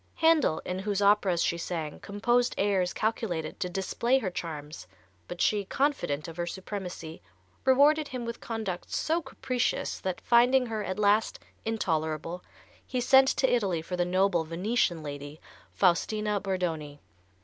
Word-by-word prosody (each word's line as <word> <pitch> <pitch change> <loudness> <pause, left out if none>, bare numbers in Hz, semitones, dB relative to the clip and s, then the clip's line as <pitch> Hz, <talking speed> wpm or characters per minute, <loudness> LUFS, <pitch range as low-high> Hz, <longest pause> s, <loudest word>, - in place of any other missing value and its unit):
Handel, 320 - +3
in 180 +1 -3
whose 200 0 -1
operas 200 -4 +3
she 170 - 0
sang, 160 -4 -4
composed 240 +5 +1
airs 195 -3 +1
calculated 195 -8 -2
to 180 -3 -2
display 195 +7 +1
her 210 -8 -2
charms, 150 - -6 0.4
but 175 - -7
she, 210 -1 +2
confident 195 - -1
of 165 0 -9
her 175 0 -2
supremacy, 180 -4 -6 0.4
rewarded 290 +3 +5
him 250 -2 -5
with 235 0 -6
conduct 220 -6 -4
so 330 +2 0
capricious 255 -3 -2
that, 185 -2 -3
finding 250 +2 +4
her 220 -3 -3
at 190 -1 -3
last 210 +1 +2 0.3
intolerable, 165 -5 -2 0.4
he 255 - -3
sent 265 +2 +6
to 265 - +2
Italy 195 -10 +1
for 180 - -4
the 175 - +1
noble 180 -1 +2
Venetian 175 +1 0
lady, 145 +1 -7 0.3
Faustina 210 +3 +1
Bordoni. 165 -7 -3
195 Hz, 145 wpm, -28 LUFS, 170-235 Hz, 0.4 s, sent